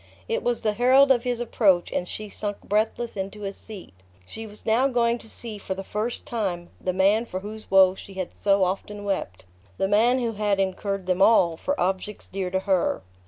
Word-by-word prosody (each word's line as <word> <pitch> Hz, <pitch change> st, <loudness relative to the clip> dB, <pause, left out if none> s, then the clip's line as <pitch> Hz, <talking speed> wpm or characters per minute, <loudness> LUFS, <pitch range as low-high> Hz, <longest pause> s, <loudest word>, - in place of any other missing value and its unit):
It 460 Hz, 0 st, -1 dB
was 240 Hz, -1 st, -1 dB
the 215 Hz, -, +1 dB
herald 260 Hz, +4 st, +5 dB
of 245 Hz, -1 st, +3 dB
his 245 Hz, -1 st, -1 dB
approach, 200 Hz, -7 st, +2 dB
and 180 Hz, -, -2 dB
she 215 Hz, +3 st, -6 dB
sunk 205 Hz, 0 st, -4 dB
breathless 220 Hz, +3 st, -1 dB
into 195 Hz, +2 st, -5 dB
a 195 Hz, -, -2 dB
seat. 200 Hz, -, -10 dB, 0.3 s
She 225 Hz, -, -8 dB
was 210 Hz, 0 st, -13 dB
now 230 Hz, +5 st, +3 dB
going 240 Hz, -2 st, +1 dB
to 225 Hz, -, -12 dB
see 220 Hz, -3 st, -7 dB
for 190 Hz, -1 st, -4 dB
the 195 Hz, -, -6 dB
first 215 Hz, +5 st, -3 dB
time 185 Hz, -7 st, -3 dB
the 185 Hz, -, +1 dB
man 195 Hz, +4 st, +3 dB
for 185 Hz, -4 st, -5 dB
whose 215 Hz, +2 st, -9 dB
woes 190 Hz, -1 st, +5 dB
she 195 Hz, -, -11 dB
had 185 Hz, -2 st, -4 dB
so 195 Hz, -1 st, +2 dB
often 200 Hz, +2 st, -3 dB
wept; 185 Hz, -, -3 dB, 0.3 s
the 195 Hz, -, +1 dB
man 225 Hz, +5 st, +4 dB
who 240 Hz, -3 st, -1 dB
had 205 Hz, -2 st, 0 dB
incurred 195 Hz, 0 st, -1 dB
them 185 Hz, +1 st, 0 dB
all 180 Hz, -6 st, +5 dB
for 285 Hz, -, -2 dB
objects 190 Hz, +3 st, -2 dB
dear 190 Hz, -1 st, -4 dB
to 190 Hz, +1 st, -1 dB
her. 190 Hz, -, +1 dB
205 Hz, 210 wpm, -25 LUFS, 190-230 Hz, 0.3 s, herald